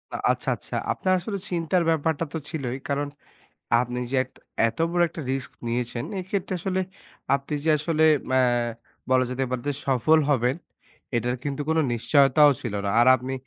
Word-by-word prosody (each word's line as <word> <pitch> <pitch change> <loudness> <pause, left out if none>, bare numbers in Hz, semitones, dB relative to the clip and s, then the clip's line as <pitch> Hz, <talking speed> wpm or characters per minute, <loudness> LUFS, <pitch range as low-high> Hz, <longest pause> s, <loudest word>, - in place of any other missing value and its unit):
আ - - -1
আচ্ছা, - - -2
আচ্ছা। - - -8 0.2
আপনার 185 0 0
আসলে 200 +3 -4
চিন্তার 175 0 +1
ব্যাপারটা 160 0 +1
তো - - -1
ছিলই। 135 -6 -3
কারণ 145 +1 0 0.7
আপনি 125 0 -3
যে - - 0
এট 130 - -19 0.4
এত - - -13
বড় 175 0 +1
একটা 160 - -7
রিস্ক 135 -1 -3 0.2
নিয়েছেন। 120 0 -2
এক্ষেত্রে 185 0 -3
আসলে 190 +2 -1 0.6
আপনি 140 +2 -6
যে 160 - +1
আসলে 155 +1 0 0.3
ম্যা 130 0 +4 0.7
বলা 130 0 +4
যেতে 130 +1 -1
পারে 125 -1 -2
যে 145 - +1
সফল 135 +5 +4
হবেন 125 -1 +2 0.6
এটার 120 +2 0
কিন্তু 145 0 -3
কোন 160 - +2 0.2
নিশ্চয়তাও 140 +5 +5
ছিল 120 -5 -4
না। - - 0
আর 120 - +5
আপনি 130 +2 -5
140 Hz, 170 wpm, -25 LUFS, 125-160 Hz, 0.7 s, নিশ্চয়তাও